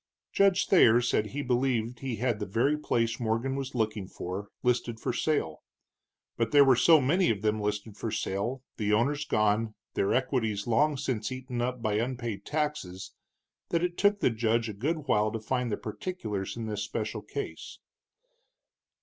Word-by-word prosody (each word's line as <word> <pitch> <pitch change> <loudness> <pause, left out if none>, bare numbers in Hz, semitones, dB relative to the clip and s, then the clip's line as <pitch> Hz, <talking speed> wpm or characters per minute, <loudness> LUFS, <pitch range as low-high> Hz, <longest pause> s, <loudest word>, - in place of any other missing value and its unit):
Judge 195 -1 +3
Thayer 120 - +6
said 120 -3 +1
he 145 +6 -4
believed 125 -2 0
he 130 -3 -3
had 115 -1 -1
the 105 - -3
very 120 +10 +2
place 115 -6 0
Morgan 120 +3 -1
was 135 -1 -4
looking 110 -4 -1
for, 95 +4 -6 0.2
listed 120 -2 0
for - - -2
sale. 110 - -1 0.8
But 115 -1 +1
there 145 +1 +7
were 130 -2 +6
so 160 +6 +6
many 170 +7 +2
of 105 -2 -1
them 110 0 +1
listed 105 0 -3
for 115 - -4
sale, 115 +6 -2
the 105 -1 0
owners 145 +7 +1
gone, 110 0 +1 0.2
their 100 - +1
equities 115 -6 0
long 145 +5 +2
since 115 -4 -2
eaten 130 -1 -4
up 125 -1 -2
by 105 -1 +1
unpaid 120 -3 -3
taxes, 150 -12 -3 0.6
that 170 0 +1
it 175 -1 -1
took 205 +1 +2
the - - +3
judge 115 0 +1
a - - -4
good 145 +8 -2
while 105 -3 +2
to 115 - -3
find 125 +1 -1
the - - -1
particulars 110 - -4
in 115 - -4
this 105 -2 -3
special 110 +1 -3
case. 140 +7 -6
115 Hz, 175 wpm, -29 LUFS, 105-135 Hz, 0.8 s, there